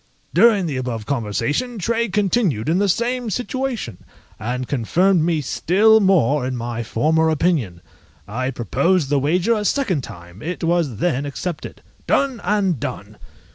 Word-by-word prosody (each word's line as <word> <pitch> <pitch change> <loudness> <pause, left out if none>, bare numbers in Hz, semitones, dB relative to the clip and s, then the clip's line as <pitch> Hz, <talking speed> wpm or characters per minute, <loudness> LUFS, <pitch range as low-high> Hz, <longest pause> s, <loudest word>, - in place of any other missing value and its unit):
During 205 +1 +5
the 145 -5 -3
above 120 -4 -4
conversation 140 - -2
Tray 230 +4 0
continued 190 - +1
in 170 +3 +2
the 200 0 +2
same 240 +4 0
situation, 250 - -3 0.4
and 125 +3 -3
confirmed 170 - +2
me 160 -1 +1
still 210 - +3
more 155 - +3
in 130 0 -2
my 120 0 -4
former 160 +8 +1
opinion. 150 - 0 0.5
I 130 +5 -2
proposed 135 - 0
the 145 - +3
wager 175 - +2
a 215 -2 -1
second 205 - 0
time, 90 -2 -11
it 175 +4 -5
was 165 -7 +1
then 145 - 0
accepted. 155 +3 -6 0.2
Done! 270 -5 +1
and 195 - +1
done! - - -6
165 Hz, 145 wpm, -20 LUFS, 130-205 Hz, 0.5 s, During